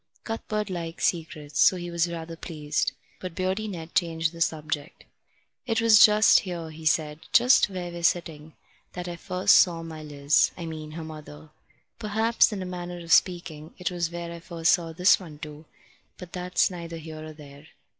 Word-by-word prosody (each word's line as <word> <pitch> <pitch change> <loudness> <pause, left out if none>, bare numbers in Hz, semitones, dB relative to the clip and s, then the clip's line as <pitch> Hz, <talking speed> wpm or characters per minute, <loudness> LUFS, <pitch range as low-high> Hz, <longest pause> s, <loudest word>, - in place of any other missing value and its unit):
Cuthbert 215 -2 -3
liked 170 -2 -5
secrets, 155 -3 -2
so - - +6
he 175 -1 -6
was 170 0 0
rather 165 0 -6
pleased. 150 -3 -2 0.3
But 180 -3 -7
Beardy 190 +3 -1
Ned 170 -4 -7
changed 165 -2 0
the 170 -1 -11
subject. 155 -2 -2 0.6
"It 225 -1 +1
was 225 -3 +7
just 215 +1 +6
here," 170 -4 -6
he 155 0 -5
said, 150 -1 +1
"just 245 -2 +5
where 180 -2 -5
we're 170 0 -7
sitting, 160 -2 -1 0.4
that 180 0 -6
I 175 - -5
first 180 +2 +2
saw 170 -2 +4
my 160 -1 -8
Liz 145 -1 +2
I 170 - -6
mean 155 -1 -7
her 165 0 -6
mother. 150 - -11 0.5
Perhaps, 220 +3 +2
in 195 -3 -4
a - - -6
manner 180 -1 -6
of 170 -1 -1
speaking, 165 -3 +1
it 180 0 -2
was 170 -2 -2
where 170 0 -6
I 170 - -8
first 165 -1 0
saw 170 -3 +1
this 180 +3 +4
one 165 -6 -11
too, 150 +1 -10 0.5
but 180 -2 -11
that's 180 +1 +1
neither 170 -2 -7
here 155 -1 -9
nor 155 0 -8
there. 145 0 -14
170 Hz, 185 wpm, -26 LUFS, 155-180 Hz, 0.6 s, was